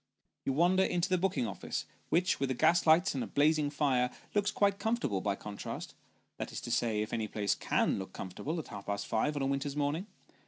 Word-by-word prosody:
You 135 Hz, -, +1 dB
wander 175 Hz, +6 st, +4 dB
into 180 Hz, 0 st, 0 dB
the 185 Hz, -1 st, +2 dB
booking 185 Hz, -9 st, +1 dB
office, 100 Hz, -, -4 dB, 0.2 s
which 180 Hz, +2 st, +2 dB
with 135 Hz, -1 st, 0 dB
the 130 Hz, -, 0 dB
gas 170 Hz, +7 st, +3 dB
lights 165 Hz, +5 st, +5 dB
and 130 Hz, -3 st, -3 dB
blazing 150 Hz, 0 st, +4 dB
fire, 135 Hz, -4 st, +2 dB, 0.2 s
looks 205 Hz, -1 st, +2 dB
quite 200 Hz, -1 st, +2 dB
comfortable 220 Hz, -, 0 dB
by 100 Hz, 0 st, 0 dB
contrast 100 Hz, 0 st, -6 dB, 0.4 s
that -, -, -4 dB
is -, -, -4 dB
to 120 Hz, -, -5 dB
say, 110 Hz, -3 st, +1 dB
if 110 Hz, -, -7 dB
any 110 Hz, -2 st, -1 dB
place 105 Hz, -1 st, 0 dB
can -, -, +1 dB
look 95 Hz, -, -6 dB
comfortable 120 Hz, -, -5 dB
at 160 Hz, -, -5 dB
half 100 Hz, -2 st, -8 dB
past 100 Hz, 0 st, -2 dB
five 150 Hz, +7 st, 0 dB
on 140 Hz, -, -1 dB
a -, -, +1 dB
winter's 140 Hz, +1 st, -1 dB
morning. 150 Hz, +6 st, -1 dB
145 Hz, 210 wpm, -32 LUFS, 110-175 Hz, 0.4 s, lights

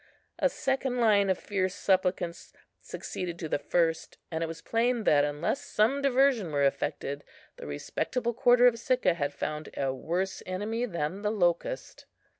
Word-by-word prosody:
A -, -, +3 dB
second 265 Hz, -, -1 dB
line 205 Hz, -4 st, +4 dB
of 190 Hz, -, +2 dB
fierce 190 Hz, -2 st, -2 dB
supplicants 180 Hz, -3 st, 0 dB, 0.3 s
succeeded 175 Hz, -2 st, -6 dB
to 165 Hz, -, -4 dB
the 145 Hz, -, -1 dB
first; 165 Hz, +1 st, 0 dB
and 160 Hz, 0 st, -1 dB
it -, -, -1 dB
was 165 Hz, 0 st, -7 dB
plain 235 Hz, 0 st, +1 dB
that, 145 Hz, -6 st, +4 dB
unless 145 Hz, -, -1 dB
some 235 Hz, +7 st, +1 dB
diversion 265 Hz, -, +3 dB
were 145 Hz, -1 st, +1 dB
effected, 140 Hz, +1 st, -1 dB, 0.3 s
the -, -, -8 dB
respectable 235 Hz, -, -2 dB
quarter 245 Hz, +1 st, +5 dB
of 235 Hz, -2 st, +4 dB
Sicca 250 Hz, -6 st, +2 dB
had 145 Hz, -4 st, -2 dB
found 150 Hz, +1 st, -4 dB
a 135 Hz, -1 st, 0 dB
worse 180 Hz, +8 st, -2 dB
enemy 215 Hz, +6 st, -2 dB
than 170 Hz, 0 st, -3 dB
the 210 Hz, -, 0 dB
locust. 195 Hz, -, -1 dB
190 Hz, 160 wpm, -29 LUFS, 165-235 Hz, 0.3 s, quarter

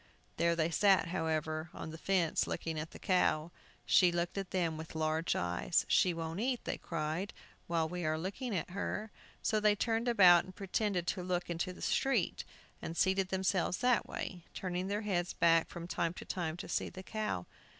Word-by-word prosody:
There 170 Hz, 0 st, +3 dB
they 165 Hz, 0 st, +1 dB
sat, 190 Hz, 0 st, +4 dB
however, 160 Hz, -2 st, -1 dB
on 160 Hz, -, -6 dB
the 160 Hz, -, -7 dB
fence, 180 Hz, -4 st, +1 dB
looking 160 Hz, -1 st, -3 dB
at 155 Hz, +1 st, -5 dB
the -, -, -11 dB
cow. 175 Hz, -4 st, +1 dB, 0.3 s
She 180 Hz, -2 st, +5 dB
looked 175 Hz, 0 st, -1 dB
at 195 Hz, -2 st, -3 dB
them 170 Hz, -4 st, 0 dB
with 160 Hz, 0 st, -8 dB
large 160 Hz, +1 st, 0 dB
eyes. 90 Hz, -, +1 dB
"She 185 Hz, -, +4 dB
won't 165 Hz, +1 st, -4 dB
eat," 245 Hz, +2 st, 0 dB
they -, -, -3 dB
cried, 165 Hz, +4 st, -3 dB, 0.3 s
"while 165 Hz, -2 st, +1 dB
we 175 Hz, +1 st, -4 dB
are 155 Hz, 0 st, +1 dB
looking 200 Hz, +7 st, -3 dB
at 175 Hz, -, -4 dB
her!" 210 Hz, +2 st, -3 dB, 0.3 s
So 215 Hz, -, +2 dB
they 210 Hz, -1 st, +4 dB
turned 225 Hz, +3 st, 0 dB
about, 185 Hz, -7 st, +7 dB
and 185 Hz, -1 st, -12 dB
pretended 195 Hz, -2 st, -1 dB
to 180 Hz, -, -1 dB
look 180 Hz, -1 st, -2 dB
into 170 Hz, +2 st, -2 dB
the 180 Hz, -, -10 dB
street, 255 Hz, -10 st, +1 dB, 0.4 s
and 165 Hz, +1 st, -5 dB
seated 190 Hz, 0 st, +2 dB
themselves 190 Hz, -1 st, +1 dB
that 250 Hz, -1 st, +2 dB
way, 180 Hz, -2 st, -5 dB
turning 185 Hz, 0 st, -2 dB
their 205 Hz, +2 st, -1 dB
heads 180 Hz, -5 st, -1 dB
back, 165 Hz, -1 st, +4 dB
from 170 Hz, -1 st, -7 dB
time 170 Hz, -1 st, -1 dB
to -, -, -8 dB
time, 170 Hz, -3 st, -3 dB
to -, -, -7 dB
see -, -, -1 dB
the 185 Hz, -, -9 dB
cow. 215 Hz, -, -3 dB
175 Hz, 190 wpm, -33 LUFS, 165-195 Hz, 0.4 s, about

